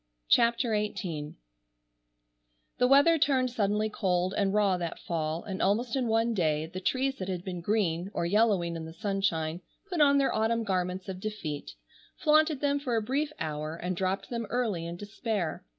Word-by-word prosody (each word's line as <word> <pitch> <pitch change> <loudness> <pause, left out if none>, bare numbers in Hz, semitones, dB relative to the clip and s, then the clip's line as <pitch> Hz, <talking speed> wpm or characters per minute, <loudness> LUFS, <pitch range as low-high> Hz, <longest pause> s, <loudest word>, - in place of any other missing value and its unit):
CHAPTER 235 +1 +4
XVIII 180 -8 -3 1.4
The 250 - +5
weather 285 +5 +6
turned 260 -3 +2
suddenly 210 -1 +1
cold 185 -3 0
and 200 -2 +1
raw 205 -2 +3
that 170 -2 -4
Fall, 160 -1 -3
and 190 -2 -5
almost 230 +5 +1
in 255 -3 0
one 225 +1 +2
day, 155 -6 +1
the 175 +3 -7
trees 265 +7 0
that 185 0 -4
had 180 -2 -3
been 180 -2 -5
green, 180 -3 0
or 170 - -2
yellowing 195 -3 +2
in 165 -1 -5
the 160 - -9
sunshine, 175 -4 -1 0.3
put 345 -4 +1
on 280 -1 +6
their 275 -1 +2
autumn 230 +1 +1
garments 185 -2 -2
of 190 -1 -5
defeat, 185 -8 -5 0.4
flaunted 310 -2 +3
them 285 -1 +1
for 255 -4 -2
a 225 - +2
brief 285 +6 -1
hour, 155 0 -3
and 180 +2 -3
dropped 190 +4 -2
them 230 -2 -3
early 215 -9 -1
in 170 +1 -6
despair. 205 -2 -3
200 Hz, 175 wpm, -29 LUFS, 175-235 Hz, 1.4 s, weather